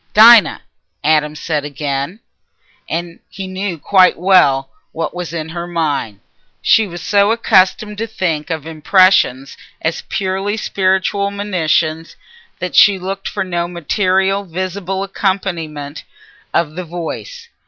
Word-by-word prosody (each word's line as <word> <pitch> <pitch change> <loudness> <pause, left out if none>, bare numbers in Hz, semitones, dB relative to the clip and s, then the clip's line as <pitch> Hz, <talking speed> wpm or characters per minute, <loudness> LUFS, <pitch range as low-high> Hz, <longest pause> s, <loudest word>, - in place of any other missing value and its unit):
"Dinah!" 225 0 +7 0.4
Adam 150 0 +2
said 150 -1 -2
again. 145 - -4 1.1
He 190 +1 -7
knew 185 -1 -4
quite 185 +3 +4
well 150 -7 +3 0.2
what 165 - -3
was 180 -2 -5
in 160 -2 -5
her 170 +1 -5
mind. 150 - -2 0.4
She 220 -2 +3
was 175 -1 -8
so 200 0 +3
accustomed 210 -1 +2
to 225 - -2
think 175 -8 -2
of 160 -3 -4
impressions 160 -4 +2 0.2
as 160 0 -2
purely 195 +2 -2
spiritual 195 0 0
monitions 170 -5 -1 0.4
that 180 -1 -5
she 200 -1 +6
looked 190 +1 -5
for 200 - -2
no 175 -2 -2
material 190 +3 0
visible 185 +1 -4
accompaniment 175 -7 -3 0.5
of 155 -3 0
the 180 +3 -5
voice. 180 - -7
180 Hz, 120 wpm, -17 LUFS, 160-195 Hz, 1.1 s, Dinah